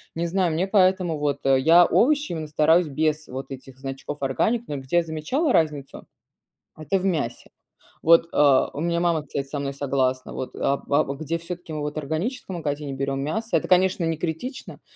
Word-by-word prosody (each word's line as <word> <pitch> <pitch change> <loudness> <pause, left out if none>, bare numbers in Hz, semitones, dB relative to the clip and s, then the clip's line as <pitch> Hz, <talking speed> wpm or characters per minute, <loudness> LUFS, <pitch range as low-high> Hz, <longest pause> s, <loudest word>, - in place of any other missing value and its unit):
Не 170 +1 -1
знаю, 180 -1 0
мне 170 +4 0
поэтому 185 -4 +2
вот, 145 -1 -1
э, 135 -1 +4
я 165 +6 +6
овощи 295 - +2
именно 160 -2 -4
стараюсь 155 +3 +3
без 155 +1 -1
вот 130 +1 -6
этих 135 0 -10
значков 135 +2 -6
"Органик", 220 - 0
но 145 - -4
где 135 +5 -1
я 175 - +4
замечала 165 - -1
разницу- 150 -4 -1 0.7
это 175 +5 -1
в 185 - -4
мясе. 155 -11 -2 0.5
Вот, 165 +1 +5
а, 140 -3 +4
у 145 - -4
меня 170 +1 0
мама, 170 -3 +1
кстати, 140 0 -4
со 145 +2 -5
мной 140 0 -3
согласна 130 -2 -1
вот, 130 - -6
а, 140 - 0
а, 145 +2 +3
где 160 +3 -3
всё-таки 170 0 -8
мы 155 - -3
вот 150 0 -4
в - - -1
органическом 175 - -3
магазине 145 -3 -3
берем 135 0 -2
мясо- 220 +11 -3
это, - - -6
конечно, 185 -1 +3
не 165 0 0
критично, 175 - -5
155 Hz, 195 wpm, -24 LUFS, 140-175 Hz, 0.7 s, я